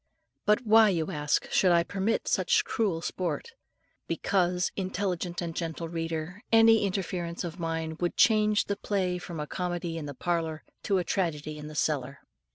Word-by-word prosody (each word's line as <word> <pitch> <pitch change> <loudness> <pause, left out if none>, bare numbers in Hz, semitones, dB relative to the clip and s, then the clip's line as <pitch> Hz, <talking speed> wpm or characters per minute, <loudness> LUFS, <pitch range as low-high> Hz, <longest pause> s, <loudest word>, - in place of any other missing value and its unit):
But 210 +3 +3
why, 220 0 +7
you 165 -5 -1
ask, 150 -1 0
should 185 - +4
I 170 -1 +5
permit 200 +5 -1
such 460 -3 +2
cruel 185 -7 -1
sport? 185 - -3 0.6
Because, 180 -2 +1
intelligent 185 -2 -2
and 165 -1 -5
gentle 165 0 -3
reader, 165 +3 -4
any 225 -2 +6
interference 180 -3 -3
of 170 +1 -6
mine 160 -1 -3
would 175 -1 -1
change 215 -2 +4
the 200 - -2
play 185 -4 -1
from 175 -2 -7
a 150 - -2
comedy 175 0 -3
in 150 - -6
the 140 - -7
parlour 165 -1 -2 0.2
to 195 - +2
a 180 - +1
tragedy 155 -6 -2
in 150 - -7
the 155 - -9
cellar. 135 -3 -1
175 Hz, 165 wpm, -28 LUFS, 165-200 Hz, 0.6 s, why